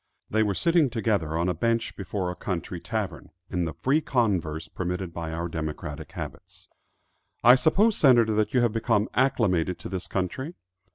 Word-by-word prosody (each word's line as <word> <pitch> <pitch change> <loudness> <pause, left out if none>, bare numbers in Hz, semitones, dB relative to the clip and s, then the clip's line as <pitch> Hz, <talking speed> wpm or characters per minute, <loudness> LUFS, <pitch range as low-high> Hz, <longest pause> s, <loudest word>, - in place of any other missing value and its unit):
They 110 - +3
were 105 -3 +1
sitting 165 - +3
together 100 -10 0
on 85 +2 +1
a 90 - +1
bench 115 +6 0
before 95 -1 -3
a - - -7
country 90 -1 -4
tavern, 90 - -4 0.2
in 90 -1 0
the 80 - -4
free 145 +4 +2
converse 95 - 0
permitted 90 0 -4
by 85 -1 -4
our 85 +1 -3
democratic 80 -2 -5
habits. - - -9 0.7
"I 120 - +9
suppose, 195 - +3
Senator, 120 -6 +5
that 105 0 +1
you 125 - +3
have 120 -3 +2
become 115 -2 +1
acclimated 90 -10 +2
to 80 - -8
this 95 -1 -4
country?" 130 - -3
100 Hz, 170 wpm, -26 LUFS, 85-120 Hz, 0.7 s, I